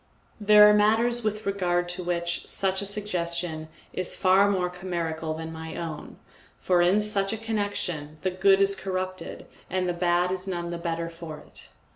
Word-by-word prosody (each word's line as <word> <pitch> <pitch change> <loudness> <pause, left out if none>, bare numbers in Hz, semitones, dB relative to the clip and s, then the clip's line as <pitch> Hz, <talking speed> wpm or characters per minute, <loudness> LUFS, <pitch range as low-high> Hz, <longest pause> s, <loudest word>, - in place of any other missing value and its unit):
There 210 0 +7
are 210 - +6
matters 225 +3 +2
with 215 0 -2
regard 175 -3 0
to 180 +1 -3
which 170 0 -2
such 190 0 0
a 200 - -2
suggestion 170 -5 -3 0.3
is 185 - -2
far 195 +1 +4
more 185 -3 +1
chimerical 170 -3 -4
than 160 0 -6
my 160 0 -7
own, 160 -3 -6 0.4
for 180 -2 +2
in 185 +4 +4
such 200 -2 +3
a 225 - -3
connection 205 -9 -3
the 185 - 0
good 195 +1 +4
is 195 0 +2
corrupted 185 -1 -5 0.2
and 185 -1 -1
the 175 - 0
bad 175 +1 +1
is 185 +1 -2
none 175 -2 -3
the 170 - -5
better 170 -1 -3
for 165 -2 -8
it. - - -13
185 Hz, 175 wpm, -26 LUFS, 170-200 Hz, 0.4 s, There